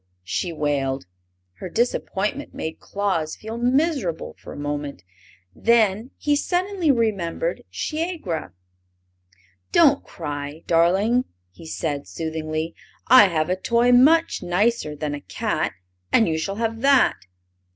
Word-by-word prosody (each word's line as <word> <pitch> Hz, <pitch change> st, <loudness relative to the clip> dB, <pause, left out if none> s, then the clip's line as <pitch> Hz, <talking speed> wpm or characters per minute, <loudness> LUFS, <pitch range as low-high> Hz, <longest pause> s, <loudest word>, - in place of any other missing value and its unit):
she 90 Hz, -, -2 dB
wailed. 140 Hz, -, -1 dB, 0.5 s
Her 185 Hz, -, -6 dB
disappointment 235 Hz, +3 st, -1 dB
made 160 Hz, -, -5 dB
Claus 185 Hz, -6 st, -2 dB
feel 225 Hz, +2 st, -7 dB
miserable 250 Hz, -, 0 dB
for -, -, -11 dB
a -, -, -8 dB
moment. 145 Hz, -, -4 dB, 0.5 s
Then 225 Hz, 0 st, +2 dB
he 295 Hz, 0 st, +1 dB
suddenly 360 Hz, +2 st, 0 dB
remembered 225 Hz, -, 0 dB
Shiegra. 310 Hz, -, -3 dB, 1.2 s
"Don't -, -, +5 dB
cry, 145 Hz, +2 st, -6 dB
darling!" 195 Hz, +9 st, +3 dB, 0.3 s
he 100 Hz, -, -13 dB
said, 145 Hz, -3 st, -3 dB
soothingly; 160 Hz, 0 st, -3 dB, 0.4 s
"I 250 Hz, -4 st, +9 dB
have 165 Hz, -1 st, 0 dB
a -, -, +2 dB
toy 235 Hz, +5 st, +2 dB
much 315 Hz, +7 st, +5 dB
nicer 180 Hz, -3 st, 0 dB
than 150 Hz, 0 st, -3 dB
a 145 Hz, -, -5 dB
cat, 90 Hz, -, -2 dB, 0.4 s
and 225 Hz, -, +4 dB
you 160 Hz, -1 st, 0 dB
shall 195 Hz, +5 st, -3 dB
have 225 Hz, +1 st, -2 dB
that." 275 Hz, -, +4 dB
195 Hz, 120 wpm, -23 LUFS, 155-245 Hz, 1.2 s, I